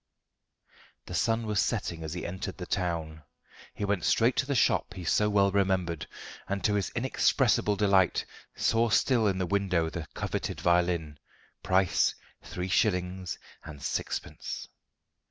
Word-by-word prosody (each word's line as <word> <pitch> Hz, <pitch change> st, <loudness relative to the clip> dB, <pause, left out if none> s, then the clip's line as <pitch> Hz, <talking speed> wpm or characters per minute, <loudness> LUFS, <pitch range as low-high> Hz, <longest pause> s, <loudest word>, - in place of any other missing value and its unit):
The -, -, -8 dB
sun 115 Hz, 0 st, +1 dB
was 105 Hz, -2 st, 0 dB
setting 85 Hz, 0 st, -1 dB
as 80 Hz, 0 st, -4 dB
he 90 Hz, -, -4 dB
entered 95 Hz, +2 st, -5 dB
the 90 Hz, -, -6 dB
town. 85 Hz, -4 st, -2 dB, 0.5 s
He 105 Hz, -, -2 dB
went 100 Hz, -2 st, 0 dB
straight 115 Hz, +3 st, +3 dB
to 130 Hz, -, +1 dB
the 140 Hz, -, 0 dB
shop -, -, +2 dB
he 90 Hz, -, -6 dB
so 105 Hz, +5 st, +2 dB
well 100 Hz, -1 st, +3 dB
remembered, 95 Hz, -4 st, 0 dB, 0.4 s
and 100 Hz, 0 st, -2 dB
to 105 Hz, -, +2 dB
his 100 Hz, -2 st, 0 dB
inexpressible 105 Hz, -, +2 dB
delight 100 Hz, -3 st, +3 dB, 0.3 s
saw 115 Hz, +1 st, +2 dB
still 115 Hz, +1 st, +3 dB
in 95 Hz, -2 st, +1 dB
the 95 Hz, -, 0 dB
window 90 Hz, -4 st, 0 dB
the 85 Hz, -2 st, -5 dB
coveted -, -, -3 dB
violin, 85 Hz, -4 st, +1 dB, 0.4 s
price 95 Hz, -1 st, +2 dB, 0.3 s
three 90 Hz, 0 st, -5 dB
shillings 90 Hz, -2 st, 0 dB, 0.3 s
and 75 Hz, -1 st, -9 dB
sixpence. -, -, -4 dB
95 Hz, 145 wpm, -29 LUFS, 85-105 Hz, 0.5 s, straight